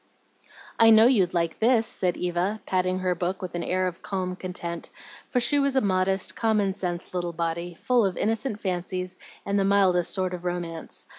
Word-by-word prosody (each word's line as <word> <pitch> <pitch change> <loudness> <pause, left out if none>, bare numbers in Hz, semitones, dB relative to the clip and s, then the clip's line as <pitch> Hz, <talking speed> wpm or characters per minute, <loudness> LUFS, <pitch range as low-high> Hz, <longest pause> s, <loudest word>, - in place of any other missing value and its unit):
"I 225 - +7
know 220 0 +8
you'd 195 -8 +3
like 170 -1 -1
this," 230 0 +3
said 180 -4 -1
Eva, 180 +4 -1
patting 185 0 0
her 185 -1 0
book 180 +2 -2
with 185 - -6
an 175 - -2
air 185 +2 0
of 180 -2 -4
calm 185 -2 -3
content; 175 -2 -6 0.4
for 250 - +1
she 245 +4 +2
was 280 -1 +1
a - - +5
modest, 190 -1 +1
common 210 -4 +1
sense 175 -2 -4
little 175 -1 -2
body, 170 +1 -3
full 245 +5 +2
of 190 -3 -1
innocent 225 +1 -1
fancies 185 0 -3 0.3
and 200 0 +1
the - - +2
mildest 190 -3 +3
sort 185 -1 -1
of 180 -1 -6
romance. 175 -2 -4
185 Hz, 190 wpm, -26 LUFS, 175-205 Hz, 0.4 s, know